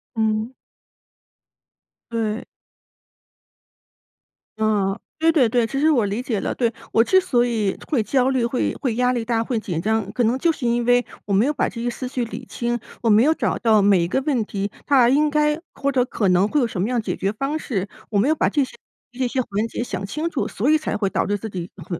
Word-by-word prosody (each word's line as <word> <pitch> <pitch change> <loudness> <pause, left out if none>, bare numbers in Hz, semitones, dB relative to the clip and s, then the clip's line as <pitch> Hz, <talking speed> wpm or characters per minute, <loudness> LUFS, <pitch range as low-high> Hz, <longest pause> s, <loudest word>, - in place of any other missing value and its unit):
嗯。 220 +2 0 1.6
对。 225 -1 -2 2.1
嗯， 205 -3 +1 0.2
对 325 - +3
对 255 -8 +4
对， 235 -1 +2
其 275 - -4
实 315 +1 +4
我 240 -7 +3
理 205 +5 -2
解 230 -5 -2
了， - - -3
对。 235 -2 0 0.2
我 225 - +5
之 375 +8 +4
所 245 -10 +2
以 220 -5 -1
会 270 -8 +2
焦 255 +3 +2
虑， 255 -3 +1
会 245 +1 -1
会 245 -6 -2
压 250 +1 +2
力 240 -2 -2
大， 230 -1 0
会 230 -1 -1
紧 170 -6 -3
张， 220 0 0
可 245 - +1
能 235 +4 +2
就 335 - +2
是 280 - -5
因 235 0 +1
为 245 0 +3 0.2
我 200 - -2
没 205 +6 +4
有 300 - +1
把 - - 0
这 230 - -6
些 245 - 0
思 255 +2 -5
绪 250 -1 -2
理 230 - -8
清， 240 0 -2 0.2
我 230 - +1
没 215 +3 +6
有 315 +3 +4
找 - - -1
到 220 -3 +4
每 195 -3 +4
一 170 - 0
个 265 - 0
问 260 -6 0
题 200 0 -3
它 260 -4 +5
应 300 +3 +3
该 300 +1 +1
或 280 0 -1
者 255 -2 +2
可 205 -5 0
能 180 +3 +4
会 295 +4 +1
有 - - +3
什 185 - -4
么 195 - +1
样 245 -1 0
解 - - -3
决 195 +2 -1
方 275 +7 -2
式。 200 -9 -3 0.2
我 210 - 0
没 230 +8 +3
有 315 - +3
把 - - +1
这 290 -3 +2
些 255 - -7 0.4
这 250 0 -1
些 255 +1 0
环 215 -1 -2
节 240 - -4
想 195 -4 -4
清 310 +11 -3
楚， 300 - -2
所 245 +9 -1
以 310 - +5
才 310 - -3
会 200 -2 0
导 - - 0
致 205 +1 0
自 220 +2 -6
己 180 -2 -6
很 175 -1 -6
235 Hz, 250 characters per minute, -22 LUFS, 210-260 Hz, 2.1 s, 没